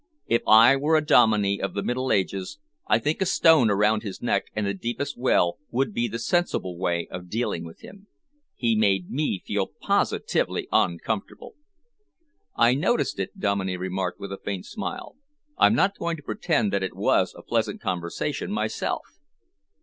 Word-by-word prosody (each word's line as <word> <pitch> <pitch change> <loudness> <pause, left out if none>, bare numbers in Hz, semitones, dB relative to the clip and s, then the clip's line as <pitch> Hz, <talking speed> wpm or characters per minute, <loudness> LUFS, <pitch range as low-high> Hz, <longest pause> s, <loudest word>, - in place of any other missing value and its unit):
If 115 - +1
I 115 +5 +8
were 150 +4 +2
a 155 -1 +2
Dominey 105 -8 +4
of 100 -2 -3
the 100 - -2
Middle 130 +1 -1
Ages, 95 0 -1 0.3
I 105 - +4
think 150 +10 -2
a - - +3
stone 160 -9 +5
around 105 +2 +2
his 100 -4 -7
neck - - 0
and 105 -1 -1
the 100 - -1
deepest 120 +8 -4
well 105 -8 +1
would 125 -2 -1
be 120 +2 0
the 115 +1 -4
sensible 115 - -1
way 85 -1 -1
of 90 0 -8
dealing 110 -6 -2
with 80 -1 -11
him. 200 +1 -14 0.5
He 115 -2 +1
made 100 -4 +1
me 135 -9 -1
feel 100 -2 -1
positively - - -1
uncomfortable." 100 +5 -1 1.0
"I 120 +1 +4
noticed 180 - 0
it," 200 - -5
Dominey 95 - -1
remarked, 95 0 -3
with 100 - -7
a 100 - -6
faint 100 -3 -4
smile. - - -6 0.4
"I'm - - +5
not 195 +1 +1
going 170 -1 -2
to 145 - -13
pretend 145 - 0
that 100 - +1
it 95 - -4
was - - +1
a - - -12
pleasant - - -1
conversation 85 -2 -3
myself." - - -2
110 Hz, 170 wpm, -25 LUFS, 95-135 Hz, 1.0 s, I